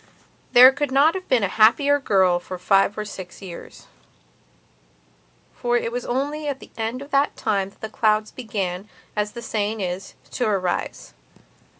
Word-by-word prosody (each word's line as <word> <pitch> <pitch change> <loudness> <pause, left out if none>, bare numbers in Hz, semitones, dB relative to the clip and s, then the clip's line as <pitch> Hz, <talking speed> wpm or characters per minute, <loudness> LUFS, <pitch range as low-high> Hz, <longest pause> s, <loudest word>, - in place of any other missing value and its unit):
There 255 +1 +10
could 285 0 -3
not 285 +5 +4
have 375 -1 -6
been 250 -5 +2
a - - +2
happier 265 +9 +4
girl 190 -8 +2
for 185 +1 -8
five 195 +3 +2
or 215 - -3
six 190 -3 -9
years. 180 -4 -11 1.7
For 240 0 0
it 230 - -2
was 245 +1 -4
only 290 +4 -2
at 280 -2 -3
the - - -14
end 230 +4 -3
of 280 - -15
that 280 +1 +1
time 195 -3 -1
that 220 - -6
clouds 215 -1 +1
began, 200 -5 -4 0.3
as 210 0 -2
the 235 -1 -8
saying 215 0 -2
is, 185 +1 -5 0.2
to 245 - -1
arise. 185 - -2
220 Hz, 165 wpm, -22 LUFS, 195-260 Hz, 1.7 s, There